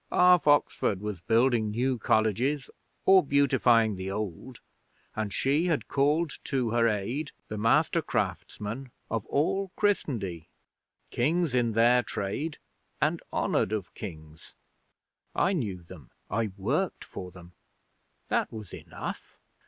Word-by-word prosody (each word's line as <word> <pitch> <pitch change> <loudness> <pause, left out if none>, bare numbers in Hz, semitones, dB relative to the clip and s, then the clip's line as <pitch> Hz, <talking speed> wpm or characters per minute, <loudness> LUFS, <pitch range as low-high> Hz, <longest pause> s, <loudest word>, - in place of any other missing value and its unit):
Half 180 -4 +5
Oxford 145 -8 +3
was 105 -3 -5
building 115 +1 +2
new 125 +3 0
colleges 115 +8 +1 0.3
or 190 -1 +7
beautifying 120 -7 +3
the 95 +1 -4
old, 105 +5 -5 0.6
and 110 -2 -2
she 145 - +1
had 160 -4 0
called 150 +3 +1
to 130 -5 0
her 115 0 +3
aid 115 +8 -2 0.2
the 105 - -4
master 115 +2 +3
craftsmen 115 +6 -3 0.2
of 115 -3 -2
all 190 +6 0
Christendie 110 - -1 0.6
kings 160 +4 +1
in 120 -3 +2
their 120 +2 +5
trade 120 +9 -3 0.4
and - - +1
honoured - - +1
of 105 -4 -3
Kings. 80 -5 -10 0.8
I 190 - +2
knew 100 - -3
them. 85 -7 -13 0.2
I 110 +1 +1
worked 95 - -1
for 90 - -8
them: 90 -1 -14 0.8
that - - 0
was 110 -4 -9
enough. - - -7
115 Hz, 125 wpm, -28 LUFS, 105-140 Hz, 0.8 s, or